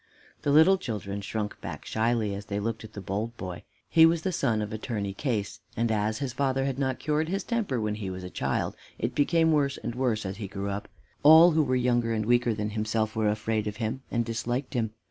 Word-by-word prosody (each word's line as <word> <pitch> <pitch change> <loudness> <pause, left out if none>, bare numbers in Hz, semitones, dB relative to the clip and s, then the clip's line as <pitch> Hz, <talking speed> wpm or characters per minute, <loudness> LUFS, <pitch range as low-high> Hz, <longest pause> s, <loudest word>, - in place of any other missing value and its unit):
The - - -1
little 160 +6 +6
children 100 - -4
shrunk 105 +1 -4
back - - -7
shyly, 110 -2 0
as 100 +1 -6
they 100 0 -3
looked 115 +2 -3
at 110 - -11
the 100 - -6
bold 105 +5 -3
boy. 90 -2 -6 0.3
He 160 - +5
was 165 0 +5
the 190 - 0
son 115 -10 +1
of 105 - -6
Attorney 105 -3 -3
Case, 105 -3 -2 0.2
and 115 0 +1
as 110 0 0
his 135 -3 -3
father 135 0 0
had 135 -1 -2
not 130 -2 0
cured 155 +1 0
his 195 +1 -1
temper 220 - -1
when 105 -1 -1
he 105 -3 -4
was 90 0 -6
a 90 - -7
child, - - -1 0.2
it 115 +3 -2
became 160 +4 +3
worse 140 -2 +2
and - - -4
worse 120 -4 0
as 95 +1 -4
he 105 -2 -5
grew 100 +1 -4
up. 100 +1 -4 0.3
All 160 +4 +9
who 160 0 +3
were 130 -3 +1
younger 120 -2 +2
and 110 -1 -1
weaker 120 -1 +3
than 105 0 -2
himself 110 0 -1
were 110 -1 +2
afraid 110 0 -1
of 105 0 -4
him 115 +4 -2
and 120 -1 0
disliked 120 +4 -2
him. 115 -4 0
115 Hz, 230 wpm, -28 LUFS, 105-135 Hz, 0.3 s, All